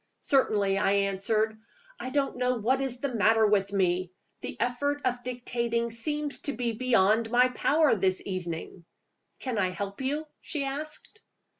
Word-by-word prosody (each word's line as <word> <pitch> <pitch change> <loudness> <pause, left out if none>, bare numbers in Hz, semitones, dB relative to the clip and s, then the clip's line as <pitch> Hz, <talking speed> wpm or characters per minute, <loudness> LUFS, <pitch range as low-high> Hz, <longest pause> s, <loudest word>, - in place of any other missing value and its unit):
"Certainly," 205 -8 +2
I 195 0 +2
answered. 200 +2 +1 0.4
"I 255 - -4
don't 275 -1 0
know 250 0 +1
what 250 +4 +1
is 255 -2 -3
the 280 -3 -2
matter 225 0 +4
with 200 -2 +2
me. 185 -2 +1 0.3
The - - -6
effort 285 +4 0
of 245 -1 0
dictating 235 -1 -2
seems 295 +5 -3
to 285 - -3
be 245 -2 -1
beyond 225 -2 +2
my 250 +2 +4
power 295 +2 +3
this 190 -2 +1
evening." 175 -2 -5 0.5
"Can 250 -5 -3
I 185 -2 +2
help 200 +5 -5
you?" 290 +4 -1
she 300 -3 -3
asked. 300 +9 -6
235 Hz, 155 wpm, -28 LUFS, 200-265 Hz, 0.5 s, matter